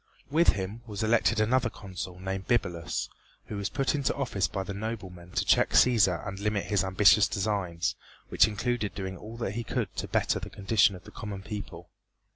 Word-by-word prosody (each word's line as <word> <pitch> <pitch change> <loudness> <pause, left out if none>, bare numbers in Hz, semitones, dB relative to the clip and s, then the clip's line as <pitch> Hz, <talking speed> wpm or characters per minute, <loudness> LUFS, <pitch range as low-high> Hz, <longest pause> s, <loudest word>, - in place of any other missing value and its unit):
With 165 +3 +5
him 100 +3 -5
was 105 -1 -4
elected 110 -1 +3
another 120 +3 +2
Consul 95 -3 -7
named 95 0 -4
Bibulus, 85 -9 0 0.4
who 105 - -6
was 100 -1 -2
put 135 -1 0
into 140 -2 0
office 115 -10 0
by 95 - -3
the 100 - -5
noblemen 95 -5 -6
to - - 0
check - - +4
Cæsar 105 -8 +4
and 95 0 -5
limit 105 -2 -1
his 100 -3 +1
ambitious 100 +2 +5
designs, 95 -4 -1 0.4
which - - +5
included 110 -2 -2
doing 95 -1 -4
all 110 +5 -9
that 115 - -2
he 120 +3 -3
could - - -3
to - - -2
better - - +1
the - - -7
condition 100 0 +3
of 90 - -12
the - - -13
common 100 -2 -6
people. 100 -5 -7
100 Hz, 190 wpm, -28 LUFS, 95-110 Hz, 0.4 s, With